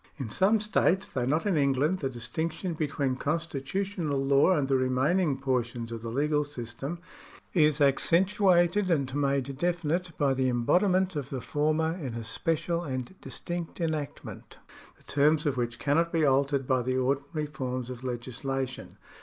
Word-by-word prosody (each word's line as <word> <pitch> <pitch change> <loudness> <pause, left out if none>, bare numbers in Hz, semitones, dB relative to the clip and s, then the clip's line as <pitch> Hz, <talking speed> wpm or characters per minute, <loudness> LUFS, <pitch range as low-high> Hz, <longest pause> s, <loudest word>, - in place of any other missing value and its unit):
In 130 -7 -5
some 205 - +3
.states, 195 -2 +1
tliough 125 -2 -1
not 155 +7 +1
in 205 - +2
Englauel, 145 +4 +2
the 135 - -1
distiactiou 160 +8 -3
between 140 -4 -1
con 155 +5 0
stitutional 165 +1 -3
law 140 +6 +5
and 140 -2 0
the 135 - 0
x'eniaining 135 +4 +2
portions 120 -3 -2
of 115 -1 -5
the 115 - -5
legal 150 +4 +1
system 135 +3 -6 0.6
is 155 -4 +4
accen 150 +5 +4
tuated 190 -1 +3
and 140 -6 +1
made 140 -1 -1
definite 175 0 0
by 140 -2 +2
the 130 -1 +1
embodiment 180 - +2
of 140 -3 -3
the 135 - -3
former 155 +5 0
in 135 -10 -5
a 115 - -4
special 165 +7 -1
and 130 -1 -4
distinct 175 0 -6
enactment, 155 -4 -4 0.4
the - - -24
terms 150 +2 +2
of 145 -2 +1
which 120 -1 -2
cannot 165 +4 +1
be 165 -2 +2
altered 140 0 +2
by 130 0 +2
the 130 +1 -1
ordinary 140 +4 -1
forms 130 -4 -4
of 125 0 -8
legislation. 130 +2 -4
145 Hz, 160 wpm, -28 LUFS, 130-170 Hz, 0.6 s, law